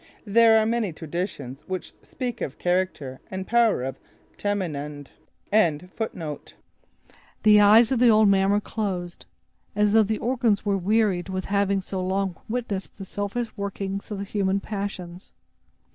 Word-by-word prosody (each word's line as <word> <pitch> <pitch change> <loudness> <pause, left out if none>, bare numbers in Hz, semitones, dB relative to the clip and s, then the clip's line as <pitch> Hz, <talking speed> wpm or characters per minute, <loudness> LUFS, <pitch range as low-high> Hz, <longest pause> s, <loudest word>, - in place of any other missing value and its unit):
There 225 +1 +6
are 220 - +3
many 225 -4 0
traditions 155 -5 -5
which 185 -1 -5
speak 250 -3 -5
of 135 - -3
the - - -32
character 175 -7 -1
and 190 0 -5
power 230 - +3
of 135 0 -5 0.4
Tamenund. 150 -8 -3 2.3
The 210 -1 +7
eyes 220 +3 +6
of 260 - +2
the 245 -1 +6
old 215 -1 +6
man 195 -1 +3
were 205 +1 +3
closed, 185 -5 -4 0.5
as 210 0 +2
though 225 - +7
the 215 +1 0
organs 230 -4 0
were 200 -1 +2
wearied 195 -1 +1
with 185 0 -3
having 200 -1 +1
so 190 0 -4
long 190 0 -1
witnessed 215 -5 -4
the 195 - -7
selfish 205 +5 -4
workings 200 -1 -4
of 210 - -4
the 200 - -4
human 195 -1 0
passions. 195 -4 -6
200 Hz, 145 wpm, -25 LUFS, 185-215 Hz, 2.3 s, The